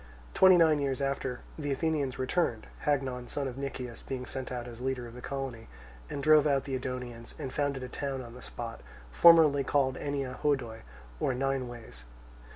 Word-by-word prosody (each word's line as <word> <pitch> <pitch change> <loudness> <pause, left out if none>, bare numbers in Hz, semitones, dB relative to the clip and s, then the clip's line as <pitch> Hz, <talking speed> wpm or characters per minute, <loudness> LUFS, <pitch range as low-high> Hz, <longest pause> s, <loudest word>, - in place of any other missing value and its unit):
Twenty 190 -1 +7
nine 160 -3 +5
years 140 -1 -1
after, 135 -2 -2 0.2
the 145 -2 -2
Athenians 145 -2 0
returned 130 -4 0 0.2
(Hagnon, 130 -4 0
son 140 -2 -2
of 125 - -5
Nicias, 130 -3 -5
being 130 -1 -5
sent 130 0 -5
out 125 -1 -4
as 120 0 -9
leader 130 -1 -2
of 115 - -10
the 125 - -9
colony) 135 -5 -5 0.4
and 140 - -4
drove 155 0 +6
out 140 -2 +2
the 135 - -5
Edonians, 125 -2 -5
and 130 - -5
founded 140 -3 -1
a - - -4
town 135 0 -4
on 120 -1 -10
the 125 - -11
spot, 115 -1 -7 0.3
formerly 155 - +7
called 130 -1 +1
Ennea 140 -3 -3
Hodoi 130 -6 0 0.4
or 130 - +1
Nine 135 0 0
Ways. 115 - -10
135 Hz, 180 wpm, -30 LUFS, 125-140 Hz, 0.4 s, Twenty